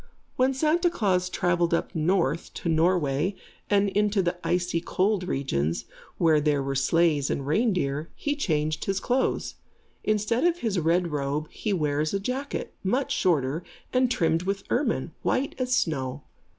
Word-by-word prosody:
When 260 +1 +2
Santa 320 +5 +2
Klaas 185 - +1
travelled 175 -2 +1
up - - -3
north 165 -1 0
to - - -5
Norway 165 0 +2 0.3
and 205 0 +3
into 205 0 +1
the 175 0 0
icy 175 -1 0
cold 185 +1 0
regions, 85 - -1 0.3
where 160 -3 +4
there 145 -2 +1
were 135 0 -2
sleighs 150 +1 +2
and 140 - -2
reindeer, 160 - 0
he 290 0 -2
changed 155 - -1
his 195 0 0
clothes. 255 +6 0 0.5
Instead 215 +3 +1
of 345 0 +3
his 210 -5 0
red 170 +2 +2
robe, 145 +1 -2
he 215 - -3
wears 150 -1 0
a - - +1
jacket, 260 +7 -4
much 250 +8 0
shorter 155 -2 +1 0.3
and 255 0 +3
trimmed 165 -7 +1
with 195 +1 -2
ermine, 230 - 0
white 275 +2 0
as 255 0 +1
snow. 140 - -1
175 Hz, 150 wpm, -26 LUFS, 150-210 Hz, 0.5 s, where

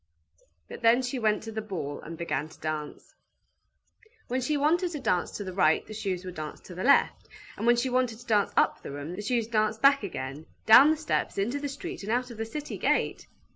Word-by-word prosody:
But - - -9
then 235 +3 +4
she 250 +1 -3
went 215 -2 +1
to 225 - -6
the 220 0 -3
ball 170 -9 -5
and 165 +1 -8
began 160 -2 -2
to - - -17
dance. 155 -1 -5 1.2
When 255 +2 0
she 295 +4 0
wanted 335 +5 +2
to 300 - -4
dance 180 -8 0
to 205 - -5
the 185 -2 -6
right, 160 -4 +3
the 215 - -9
shoes 195 -4 -3
would 180 - -6
dance 155 -2 -7
to 180 - -11
the 180 - -5
left, 280 +2 +3 0.3
and 230 - -3
when 240 - +6
she 240 +2 0
wanted 250 -3 +1
to 240 - -14
dance 210 -3 +2
up - - +3
the - - -8
room, 145 +5 -6
the 205 - -5
shoes 230 +2 0
danced 215 -1 0
back 275 0 +6
again, 140 -5 -6 0.2
down 265 +7 +9
the 315 - +2
steps, 315 - -2
into 235 +8 -1
the 285 0 -3
street, 350 +7 -7
and 205 +2 -4
out 250 +1 0
of 230 - -10
the 225 - -2
city 290 +6 -6
gate. - - 0
220 Hz, 230 wpm, -28 LUFS, 180-255 Hz, 1.2 s, down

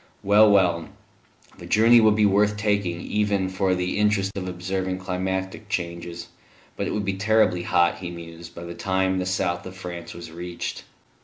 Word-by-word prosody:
Well, 105 +2 +6
well; 90 -5 +3 0.7
the - - -9
journey 115 +2 +6
would 110 -1 +5
be 105 -1 +3
worth 105 +1 +3
taking 100 -5 0
even 100 -2 0
for 95 0 +1
the 90 +2 -2
interest 105 -2 +2
of 95 -2 -4
observing 95 +1 -3
climatic 95 +2 -3
changes; 85 -3 -4 0.5
but - - -2
it - - -2
would 105 -1 -2
be 100 - 0
terribly 105 -3 +2
hot, 85 0 +2
he 90 -2 -5
mused, 85 0 -10
by 85 - -8
the 85 0 -7
time 95 +1 0
the 90 - -2
south 90 -2 -1
of 95 0 -10
France 85 -2 -7
was 85 -2 -9
reached. 85 +1 -6
95 Hz, 175 wpm, -24 LUFS, 85-100 Hz, 0.7 s, Well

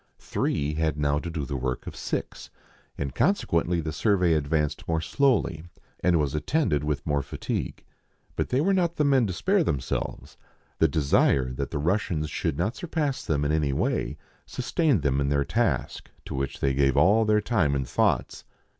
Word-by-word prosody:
Three 75 +1 -1
had 80 -1 0
now 75 0 +1
to 85 - -5
do 80 -4 -3
the 70 - -4
work 65 -1 -3
of - - -7
six, - - -4 0.5
and 70 -2 -3
consequently 85 - +1
the 80 0 -3
survey 90 -1 +2
advanced 75 -1 -1
more 80 -1 +1
slowly, 110 - +1 0.4
and 85 -2 +3
was 75 -2 0
attended 75 - 0
with 75 -1 -2
more 75 -2 +1
fatigue; - - -4 0.5
but - - -2
they 130 +2 +2
were 195 +5 +2
not 175 -3 +1
the 150 - +1
men 135 -5 +3
to 95 - -3
spare 190 - +2
them 70 - 0
selves; - - -5 0.4
the 80 - +5
desire 70 -3 +2
that 70 0 -3
the - - -3
Russians 80 -1 -1
should 80 -5 -2
not 105 +9 -1
surpass 155 -5 -2
them 75 -2 0
in 70 - +1
any 75 -3 +1
way - - -1 0.3
sustained 130 - 0
them 70 -1 +1
in 70 - 0
their 70 -1 +1
task, - - -1 0.2
to - - -6
which 70 0 -3
they 70 -1 +2
gave 70 -1 +2
all 110 +3 +5
their 105 -1 +3
time 100 - +1
and 70 -2 -2
thoughts. - - 0
80 Hz, 185 wpm, -26 LUFS, 70-105 Hz, 0.5 s, the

